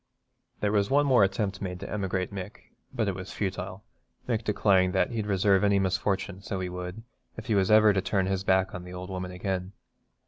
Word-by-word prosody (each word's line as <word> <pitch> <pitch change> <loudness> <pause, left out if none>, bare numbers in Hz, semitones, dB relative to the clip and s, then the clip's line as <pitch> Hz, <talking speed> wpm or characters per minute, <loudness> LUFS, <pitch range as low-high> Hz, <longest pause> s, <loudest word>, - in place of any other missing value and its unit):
There 105 - +1
was 100 -1 +2
one 145 +2 +4
more 130 -6 +5
attempt 100 +1 -1
made 90 -2 -4
to 100 - -5
emigrate 95 -2 -2
Mick, 100 +1 -8 0.2
but 110 -3 -1
it 100 - 0
was 95 +1 -7
futile, 95 0 -4 0.4
Mick 115 -2 0
declaring 95 -3 +3
that 95 - +2
'he'd 110 -3 -2
deserve 100 0 +3
any 100 -1 +4
misfortune, 95 0 -1
so 100 -1 -4
he 90 -1 -3
would, 90 +4 -6 0.3
if 110 - -7
he 115 - 0
was 95 -2 +2
ever 110 -1 +6
to 95 - +1
turn 95 0 0
his 95 0 -1
back 95 -1 +2
on 90 - -6
the 90 0 -9
old 90 +1 -7
woman 90 -1 -4
again.' 90 +1 -3
95 Hz, 210 wpm, -28 LUFS, 95-105 Hz, 0.4 s, ever